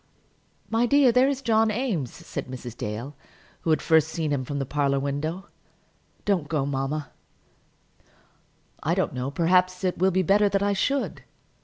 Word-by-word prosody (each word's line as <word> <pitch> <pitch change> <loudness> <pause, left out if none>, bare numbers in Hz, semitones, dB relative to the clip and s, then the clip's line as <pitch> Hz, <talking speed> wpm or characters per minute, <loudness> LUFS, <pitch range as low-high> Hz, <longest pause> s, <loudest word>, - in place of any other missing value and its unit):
"My 230 +2 +2
dear, 280 -1 +5
there 250 +3 +4
is 275 -1 -3
John 220 -2 +3
Eames," 210 - -1
said - - -7
Mrs. 125 -2 -8
Dale, 120 +7 -5 0.4
who - - -4
had 155 - +2
first 160 -2 +4
seen 160 -2 -2
him 135 -2 -1
from 140 +3 -4
the 135 - -1
parlour 140 0 0
window. 155 +7 -3 0.8
"Don't 185 -8 +1
go, 150 -4 0
mamma." 140 0 -3 1.7
"I - - 0
don't - - 0
know; 125 +1 -3
perhaps 180 +4 +2
it 185 -2 -1
will 190 +1 +4
be 185 0 +1
better 205 +4 +4
that 195 0 +1
I 205 0 +2
should." 275 +8 -1
165 Hz, 165 wpm, -25 LUFS, 140-205 Hz, 1.7 s, dear